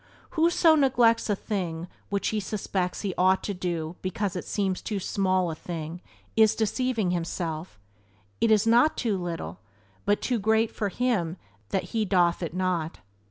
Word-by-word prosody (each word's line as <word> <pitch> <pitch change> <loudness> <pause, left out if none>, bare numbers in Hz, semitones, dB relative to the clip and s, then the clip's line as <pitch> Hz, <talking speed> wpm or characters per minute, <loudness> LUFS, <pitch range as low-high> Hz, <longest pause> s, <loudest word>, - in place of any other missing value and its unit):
"Who 330 +1 +3
so 335 -2 +5
neglects 240 -6 +3
a 205 - +3
thing 180 -5 -3 0.2
which 200 0 0
he 215 - -1
suspects 190 -2 -2
he 195 -3 -2
ought 185 +1 +4
to 205 - -2
do 175 -2 -3
because 200 0 -2
it 180 - -4
seems 195 -3 -1
too 210 -3 -3
small 185 -2 +1
a - - -3
thing 165 +1 -6 0.3
is 220 -1 +5
deceiving 225 -3 0
himself; 165 - -3 0.6
it 230 - +3
is 215 0 +4
not 240 +7 +4
too 225 -5 0
little 175 -3 -4 0.5
but 205 +1 +3
too 245 -3 0
great 220 +2 +2
for 205 - -2
him 195 -7 0 0.3
that 190 - -1
he 225 -1 +2
doeth 180 -4 +2
it 170 0 -4
not." 180 -4 -1
195 Hz, 165 wpm, -27 LUFS, 175-220 Hz, 0.6 s, so